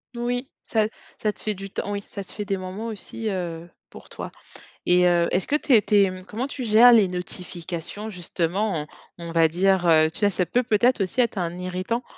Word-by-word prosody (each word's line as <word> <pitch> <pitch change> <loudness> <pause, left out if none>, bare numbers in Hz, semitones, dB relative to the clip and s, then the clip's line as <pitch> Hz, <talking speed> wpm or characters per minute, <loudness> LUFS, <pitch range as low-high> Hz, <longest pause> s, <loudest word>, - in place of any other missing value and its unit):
Oui, 245 +2 -2
ça 215 -2 +1 0.3
ça 210 -1 +1
te - - -11
fait 215 - 0
du 195 0 -8
temps 205 - -4
oui, 200 0 -3
ça 200 -2 -6
te - - -11
fait 210 0 -5
des 195 - -1
moments 185 +4 -6
aussi, 220 +1 -5
heu, 175 -3 -4 0.2
pour - - -13
toi. - - -7 0.6
Et 180 0 +5
heu, 175 -1 +3
est-ce 185 - 0
que 295 - +2
tu 295 -2 -1
es 220 - +8
tu - - -1
es, 200 -2 +5
mmh, 185 0 -9
comment 235 +6 -3
tu 275 -1 -6
gères 230 +2 +7
les 215 -5 +6
notifications, 180 +2 -6
justement, 175 -2 -2 0.3
on 170 - -7
on 165 - -6
va 165 -1 +4
dire, 185 +1 +2
heu, 155 -1 +6
tu 165 - -10
vois, 205 -1 +4
ça 185 -1 0
peut 245 - +1
peut-être 235 -1 +2
aussi 210 +7 -1
être 230 -3 -1
un 175 -1 -2
irritant 185 +6 -2
195 Hz, 225 wpm, -24 LUFS, 180-220 Hz, 0.6 s, es